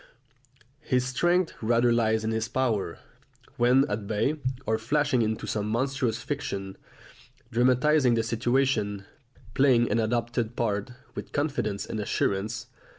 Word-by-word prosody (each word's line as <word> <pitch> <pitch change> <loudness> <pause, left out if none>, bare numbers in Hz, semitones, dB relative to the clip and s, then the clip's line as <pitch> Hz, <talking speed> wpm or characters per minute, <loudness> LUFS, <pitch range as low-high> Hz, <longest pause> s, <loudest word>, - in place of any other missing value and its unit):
His 125 -4 0
strength 175 +7 +1
rather 120 +1 +3
lies 110 -1 +2
in 110 - -1
his 110 0 -1
power, 115 -6 -1 0.6
when 125 +3 +4
at 105 -1 -3
bay, 115 +9 0 0.3
of 110 0 0
flashing 145 +1 +1
into 110 0 -1
some 105 -1 -2
monstrous 120 0 -1
fiction, 100 -9 -4 0.8
dramatising 125 +2 +3
the 115 - +1
situation, 115 -3 0 0.5
playing 125 -4 +4
an 110 - +2
adopted 120 +1 -1
part, 105 -2 -1 0.2
with - - -8
confidence 140 -9 -1
and 110 - -4
assurance. 105 +1 -1
115 Hz, 125 wpm, -27 LUFS, 110-130 Hz, 0.8 s, when